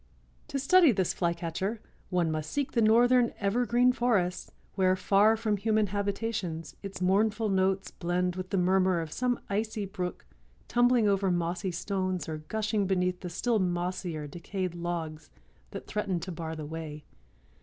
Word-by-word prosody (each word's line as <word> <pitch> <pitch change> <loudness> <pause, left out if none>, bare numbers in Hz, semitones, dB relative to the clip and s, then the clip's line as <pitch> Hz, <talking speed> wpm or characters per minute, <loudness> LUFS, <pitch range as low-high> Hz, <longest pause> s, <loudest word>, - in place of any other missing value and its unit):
To 295 -3 -3
study 320 +3 +6
this 190 -5 0
Flycatcher 170 +5 -2 0.3
"one 175 -3 +1
must 155 -1 -3
seek 285 -1 -2
the 235 - +1
northern 240 +2 +4
evergreen 240 +4 +3
forests, 200 -8 0 0.2
where, 185 -1 +3
far 205 +4 +4
from 215 -2 0
human 215 +1 +2
habitations, 200 -6 -3
its 195 -2 -7
mournful 210 +3 +2
notes 190 0 +1
blend 180 0 -1
with 185 0 -5
the 195 - 0
murmur 185 0 +3
of 160 -2 -5
some 250 +4 0
icy 215 +1 -2
brook 185 - -5 0.4
tumbling 245 -2 +3
over 195 -1 +2
mossy 175 +1 -1
stones 185 -1 -2
or 155 -1 -4
gushing 210 +4 -1
beneath 180 -1 0
the 180 - -6
still 220 +6 0
mossier 175 -3 -2
decayed 180 +4 -4
logs 165 -3 -4 0.4
that - - -8
threaten 200 -4 -2
to 185 - -5
bar 160 -1 -5
the 155 -1 -6
way. 155 -1 -7
190 Hz, 155 wpm, -29 LUFS, 175-215 Hz, 0.4 s, study